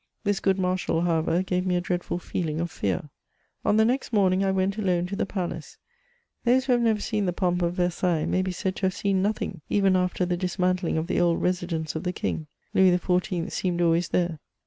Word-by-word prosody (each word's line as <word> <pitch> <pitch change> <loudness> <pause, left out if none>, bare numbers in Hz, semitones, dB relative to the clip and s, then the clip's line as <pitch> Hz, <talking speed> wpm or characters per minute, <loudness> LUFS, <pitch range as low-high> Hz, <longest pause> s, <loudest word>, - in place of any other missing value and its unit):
This 205 -2 +1
good 195 -1 +2
Marshal, 180 -3 0
however, 170 +1 +1
gave 180 -1 -1
me 185 -1 0
a - - +2
dreadful 175 -1 -2
feeling 160 -3 -3
of 170 0 -2
fear. 105 - -2 0.5
On 210 - +3
the 220 - +5
next 255 +3 0
morning 195 -3 +3
I 195 - +2
went 190 +2 0
alone 180 -4 +1
to 190 +2 -4
the - - -1
palace. 185 -4 -5 0.7
Those 255 +2 +3
who 265 - 0
have 240 -1 +4
never 225 -2 +2
seen 210 -2 -1
the 180 - 0
pomp 180 0 0
of 170 0 0
Versailles, 175 -2 0
may 185 - +1
be 185 0 -2
said 185 +1 -2
to 190 - +1
have 185 - -2
seen 195 -2 +1
nothing, 195 -4 -2
— - - -42
even 195 -2 +3
after 180 0 +1
the 175 0 -1
dismantling 180 -1 0
of 160 - 0
the - - 0
old 175 -1 +2
resi 180 -1 0
dence 160 -3 -3
of 160 - -2
the 180 - -2
king. 155 -3 -3 0.3
Louis 185 -2 +5
XIV. 180 0 -1
seemed 180 -2 -1
always 170 0 +2
there. 170 -3 0
180 Hz, 225 wpm, -26 LUFS, 175-195 Hz, 0.7 s, the